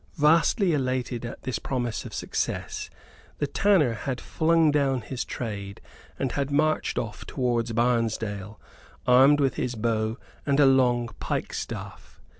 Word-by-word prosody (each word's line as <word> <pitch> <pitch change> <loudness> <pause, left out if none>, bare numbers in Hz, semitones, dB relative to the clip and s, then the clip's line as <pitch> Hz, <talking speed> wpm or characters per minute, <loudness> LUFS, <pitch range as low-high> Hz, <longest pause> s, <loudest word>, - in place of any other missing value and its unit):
Vastly 165 +5 +4
elated 130 -3 -1
at - - -9
this 130 -1 -2
promise 120 -4 -3
of - - -8
success, - - -3 0.5
the 145 - 0
tanner 160 - +3
had 125 +3 -4
flung 160 -1 +2
down 135 -3 +1
his 125 +3 -4
trade 100 -4 -5 0.4
and 135 - -1
had 140 -1 -1
marched 155 +2 +1
off 110 -1 -4
towards 120 -3 -1
Barnesdale, 110 -3 -1 0.5
armed 135 +4 +6
with 135 -2 +1
his 125 -1 -2
bow 110 0 -1 0.3
and 140 0 +1
a 145 - +7
long 125 -3 +3
pike - - -3
staff. - - -7
125 Hz, 140 wpm, -26 LUFS, 115-145 Hz, 0.5 s, a